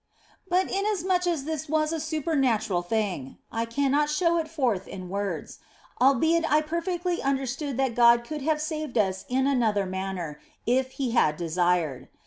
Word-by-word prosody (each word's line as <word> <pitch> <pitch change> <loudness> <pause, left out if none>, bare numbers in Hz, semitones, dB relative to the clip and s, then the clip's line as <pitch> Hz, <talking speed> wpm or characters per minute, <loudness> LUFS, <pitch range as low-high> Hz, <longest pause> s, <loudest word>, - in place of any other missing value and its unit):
But 365 +1 +2
inasmuch 380 -3 0
as 330 -5 0
this 315 0 -4
was 310 +1 +1
a 325 - -2
supernatural 270 - 0
thing 185 - -2
I 230 0 -1
cannot 280 +4 +1
show 335 +2 +2
it 320 - -2
forth 260 - -1
in 185 -2 -8
words, 200 +1 -4 0.4
albeit 320 +6 +3
I 300 +1 +5
perfectly 340 +2 -2
understood 270 0 -2
that 265 -3 +1
God 235 0 +5
could 300 +4 -6
have 305 +2 +1
saved 310 -4 -3
us 190 -3 +1
in 260 +1 +1
another 225 -7 +2
manner 185 -5 -4 0.3
if 260 +2 +1
He 265 -4 -2
had 155 -10 +3
de 170 -2 -4
sired. 175 -6 0
270 Hz, 160 wpm, -26 LUFS, 205-315 Hz, 0.4 s, I